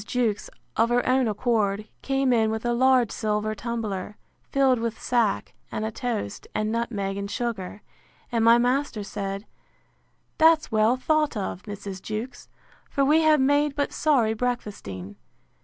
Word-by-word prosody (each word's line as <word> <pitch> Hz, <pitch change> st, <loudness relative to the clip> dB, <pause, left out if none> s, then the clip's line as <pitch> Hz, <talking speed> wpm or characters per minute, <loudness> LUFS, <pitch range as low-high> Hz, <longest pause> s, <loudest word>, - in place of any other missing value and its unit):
Jewkes, 225 Hz, -2 st, -1 dB, 0.3 s
of 230 Hz, +1 st, +3 dB
her 245 Hz, 0 st, +1 dB
own 255 Hz, -1 st, +3 dB
accord, 215 Hz, -2 st, 0 dB
came 270 Hz, -1 st, +1 dB
in 220 Hz, -2 st, +3 dB
with 220 Hz, +1 st, -3 dB
a 240 Hz, -, +2 dB
large 255 Hz, -2 st, +4 dB
silver 215 Hz, 0 st, -1 dB
tumbler, 215 Hz, -3 st, -4 dB, 0.3 s
filled 265 Hz, -3 st, +3 dB
with 230 Hz, -1 st, -3 dB
sack, 235 Hz, -5 st, 0 dB, 0.2 s
and 215 Hz, -, -2 dB
a 220 Hz, -, -2 dB
toast, 225 Hz, -, -4 dB
and 215 Hz, 0 st, 0 dB
nutmeg, 210 Hz, -4 st, -2 dB
and 200 Hz, 0 st, -4 dB
sugar; 210 Hz, -4 st, -4 dB, 0.5 s
and 230 Hz, -2 st, +1 dB
my 230 Hz, +1 st, +7 dB
master 245 Hz, -2 st, 0 dB
said, 200 Hz, 0 st, -5 dB, 0.9 s
That's 320 Hz, -3 st, +5 dB
well 220 Hz, +3 st, +3 dB
thought 305 Hz, -1 st, +1 dB
of, 190 Hz, -2 st, -3 dB
Mrs. 200 Hz, -2 st, -6 dB
Jewkes; 220 Hz, +5 st, -6 dB, 0.4 s
for 275 Hz, -, +1 dB
we 305 Hz, +3 st, +4 dB
have 310 Hz, -1 st, +5 dB
made 285 Hz, +2 st, +2 dB
but 285 Hz, -, -1 dB
sorry 255 Hz, -8 st, +2 dB
breakfasting. 205 Hz, -, -4 dB
230 Hz, 150 wpm, -25 LUFS, 210-255 Hz, 0.9 s, my